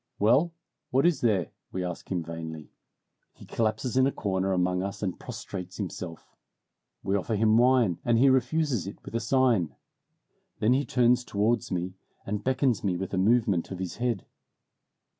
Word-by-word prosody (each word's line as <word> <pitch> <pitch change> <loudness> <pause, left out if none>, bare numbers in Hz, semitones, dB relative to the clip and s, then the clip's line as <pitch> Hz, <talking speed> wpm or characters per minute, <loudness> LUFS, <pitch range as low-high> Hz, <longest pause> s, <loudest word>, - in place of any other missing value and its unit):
"Well, 130 +11 +4 0.4
what 135 +5 +2
is 175 -3 +3
there?" 100 -8 +1 0.2
we 95 - -3
ask 90 +1 -6
him 90 -3 0
vainly. 80 -1 -7 0.6
He - - -14
collapses 110 +3 -1
in 130 0 +5
a - - +1
corner 95 -4 -1
among 90 0 +1
us 100 +2 -5
and 95 -3 -2
prostrates 90 0 -7
himself. 90 -4 -6 0.7
We 95 - 0
offer 100 +3 -1
him 110 +1 +3
wine, 120 -8 +3
and 120 -1 +3
he 130 +4 +5
refuses 130 - +2
it 100 - -7
with - - -9
a 115 - +1
sign. 115 - +2 0.8
Then 110 +2 +3
he 140 +2 +1
turns 125 -2 +3
towards 110 +1 0
me 90 0 -2 0.3
and 105 +1 -3
beckons 130 -2 +1
me 95 -3 0
with 95 +1 -5
a 95 - +1
movement 105 -4 +2
of 95 - -5
his 95 -1 -5
head. 120 -5 -1
105 Hz, 170 wpm, -28 LUFS, 95-125 Hz, 0.8 s, in